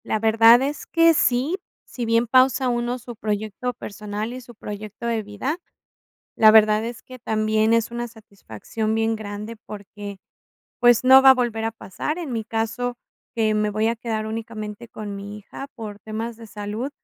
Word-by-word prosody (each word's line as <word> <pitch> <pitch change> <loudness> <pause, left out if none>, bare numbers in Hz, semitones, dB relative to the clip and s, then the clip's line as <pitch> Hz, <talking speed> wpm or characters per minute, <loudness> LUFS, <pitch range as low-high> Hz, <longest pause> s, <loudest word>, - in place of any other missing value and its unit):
La - - 0
verdad 225 +3 +6
es 285 +2 -4
que 330 0 +5
sí, 275 +4 +1 0.3
si 245 - -5
bien 230 +1 +3
pausa 255 +1 +4
uno 240 +1 -1
su 240 0 -10
proyecto 215 +3 -3
personal 210 +1 -5
y 255 - -7
su 240 -1 -14
proyecto 210 +1 -8
de 230 -1 0
vida, 215 - -4 0.8
la 215 -1 +7
verdad 215 0 +5
es 235 0 -6
que 255 - -12
también 220 -1 +1
es 230 -1 +2
una 240 0 -4
satisfacción 215 - -5
bien 225 0 +1
grande 210 +1 -6
porque, 205 -1 -9 0.6
pues, 240 -1 +5
no 265 +1 +8
va 265 0 +9
a - - +7
volver 235 -3 -1
a 225 - -1
pasar. 225 - -5
En 330 -6 -5
mi 225 -2 -2
caso, 230 +3 -2 0.4
que 220 -2 +2
me 210 0 +1
voy 215 +2 0
a 230 - 0
quedar 225 -2 -3
únicamente 220 0 -6
con 210 -3 -7
mi 200 +1 -7
hija 210 +6 -9
por 215 -4 -7
temas 220 +2 -5
de 230 -1 -11
salud, 210 +5 -4
225 Hz, 180 wpm, -23 LUFS, 215-240 Hz, 0.8 s, va